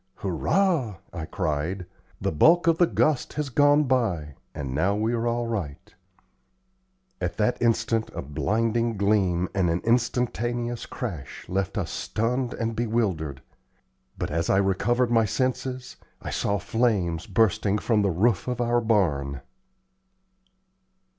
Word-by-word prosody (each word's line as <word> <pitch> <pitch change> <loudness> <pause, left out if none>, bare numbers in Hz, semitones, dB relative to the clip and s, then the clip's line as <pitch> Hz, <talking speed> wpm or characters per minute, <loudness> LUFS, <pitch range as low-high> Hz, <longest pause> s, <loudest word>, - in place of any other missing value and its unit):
"Hurrah!" 130 - 0 0.2
I 80 -3 -4
cried. 85 +3 -2 0.3
"The - - -1
bulk 165 - +5
of 165 -1 +3
the 175 - +5
gust 155 -5 +1
has 150 -2 -2
gone 145 +3 +4
by, 105 - 0 0.2
and 70 -4 -4
now 90 +8 +1
we 110 +3 0
are 120 0 0
all 120 0 0
right!" 95 -12 -5 1.3
At 90 -1 -2
that 110 +3 +1
instant 115 -1 +1
a - - -4
blinding 115 - 0
gleam 95 -3 +2
and 95 -3 +1
an 85 +2 +1
instantaneous 120 0 0
crash 85 - -6
left 95 0 -2
us - - -2
stunned 125 +3 -1
and 115 -1 -2
bewildered. 100 - -1 0.7
But - - -3
as 85 +1 -1
I - - +4
recovered 115 +6 +1
my 115 -2 +4
senses, 130 +2 -2 0.2
I - - -6
saw 100 0 0
flames 100 -5 0
bursting 105 -1 +2
from 110 0 +1
the 100 - +2
roof 95 +2 +1
of 125 -1 -2
our 120 0 +2
barn. 75 - +1
110 Hz, 135 wpm, -25 LUFS, 90-120 Hz, 1.3 s, bulk